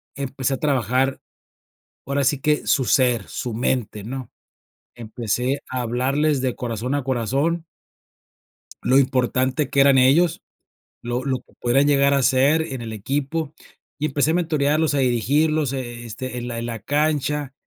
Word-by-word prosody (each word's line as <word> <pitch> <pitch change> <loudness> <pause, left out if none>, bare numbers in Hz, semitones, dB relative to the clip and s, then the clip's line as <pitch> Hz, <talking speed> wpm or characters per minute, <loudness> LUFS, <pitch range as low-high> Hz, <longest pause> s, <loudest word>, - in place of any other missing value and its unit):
empecé 135 -1 -2
a - - -6
trabajar, 135 0 0 0.8
ahora 140 +1 0
sí 140 +1 +2
que 150 0 +1
su 130 -3 +2
ser, 125 -6 +2
su 120 - -5
mente, 115 -3 -1
¿no? 130 +2 -6 0.6
Empecé 120 +4 -2
a 130 -1 -2
hablarles 135 +5 0
de 130 -2 0
corazón 120 +3 -3
a 145 - -1
corazón 135 +7 -1 1.2
lo 130 +2 +4
importante 130 +1 +1
que 140 -1 +1
eran 135 -1 +6
ellos, 155 +6 +4 0.6
lo 120 +1 -3
lo 135 -2 0
que - - -26
podrían 135 +4 +3
llegar 140 -1 +4
a 140 - +3
ser 135 +5 +3
en 130 -6 -5
el 115 - -6
equipo. 140 +8 -3 0.4
Y 155 +1 -1
empecé 145 +2 +1
a - - 0
mentorearlos, 155 -2 +1
a - - +1
dirigirlos, 140 +4 +1
eh 120 -2 -5
este, 125 +2 -6
en 120 0 -5
la 115 -1 -4
en 115 - -4
la 115 -1 -5
cancha, 145 +2 -1
135 Hz, 155 wpm, -22 LUFS, 125-145 Hz, 1.2 s, eran